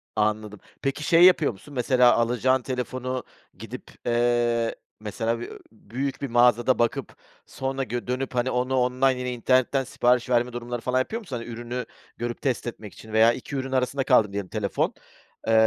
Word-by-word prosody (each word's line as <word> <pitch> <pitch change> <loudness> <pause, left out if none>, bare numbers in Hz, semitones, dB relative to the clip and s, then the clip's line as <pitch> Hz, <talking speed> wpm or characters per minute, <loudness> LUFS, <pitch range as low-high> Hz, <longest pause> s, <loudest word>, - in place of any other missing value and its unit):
Anladım. 105 -1 -1 0.2
Peki, 135 +2 -2
şey 165 +3 +5
yapıyor 180 -5 +6
musun? 120 +8 -14
Mesela 125 -1 +4
alacağın 125 +2 +2
telefonu 130 +1 -3 0.3
gidip, - - -9
eee, 120 -1 +1 0.2
mesela 115 +2 -2
bi 120 - -6
ööö, - - -10
büyük 125 +5 -5
bir 140 - -2
mağazada 120 +1 +3
bakıp 120 -1 -1 0.3
sonra 135 0 -3
gö 120 -1 -4
dönüp, 130 +1 -3
hani, 125 +1 +1
onu 125 +1 0
online, 130 +1 +2
yine 125 0 -2
internetten 130 +2 +2
sipariş 125 -1 +1
verme 120 0 +2
durumları 120 0 -5
falan 125 +1 +1
yapıyor 220 - -2
musun? 175 - -7
Hani, 115 - -7
ürünü 120 +1 -5 0.3
görüp 120 0 -4
test 130 -3 -1
etmek 105 -4 -7
için 110 -1 -12
veya 110 +2 +6
2 130 +4 -7
ürün 135 -1 -3
arasında 130 +1 0
kaldın 110 -7 +3
diyelim, 100 -2 -3
telefon, 105 -2 -1 0.5
eee, 115 - +3
125 Hz, 170 wpm, -25 LUFS, 115-130 Hz, 0.5 s, yapıyor